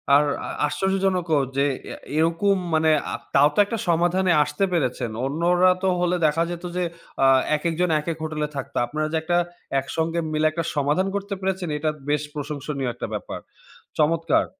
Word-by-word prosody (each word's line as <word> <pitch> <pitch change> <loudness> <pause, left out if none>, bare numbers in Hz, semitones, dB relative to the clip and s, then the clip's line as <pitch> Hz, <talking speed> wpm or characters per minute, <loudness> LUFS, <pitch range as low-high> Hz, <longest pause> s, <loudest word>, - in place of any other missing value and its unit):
আর 145 - +6 0.2
আ - - -5 0.2
আশ্চর্যজনকও 185 -2 +1 0.2
যে, 140 - +3 0.2
অ্যা - - -7 0.2
এরকম 170 +5 +2 0.2
মানে 160 0 +4 0.2
আ - - -1 0.2
তাও 145 +2 +6
তো - - +1
একটা 225 +3 -3
সমাধানে 175 +2 +2
আসতে 150 +7 -1
পেরেছেন। 125 -8 -1
অন্যরা 175 +6 +3
তো 190 - +3
হলে 180 0 +1
দেখা 160 +2 +2
যেত 175 0 -6
যে, 180 - +1 0.4
আ - - +6 0.3
একেকজন 170 +3 0
একেক 155 +1 -4
হোটেলে 155 -1 -2
থাকতো। 135 - -5
আপনারা 155 +5 -2
যে, - - +2
একটা 175 +1 +1 0.4
একসঙ্গে 165 +5 -2
মিলে 155 0 +1
একটা 165 +1 -2
সমাধান 150 +7 +1
করতে 200 0 -3
পেরেছেন 190 -2 -2
এটা 155 +1 0 0.2
বেশ 150 0 +2
প্রশংসনীয় 145 -2 -3
একটা 120 - -5
ব্যাপার। - - -5 0.6
চমৎকার! 165 +2 +2
165 Hz, 165 wpm, -23 LUFS, 150-180 Hz, 0.6 s, আর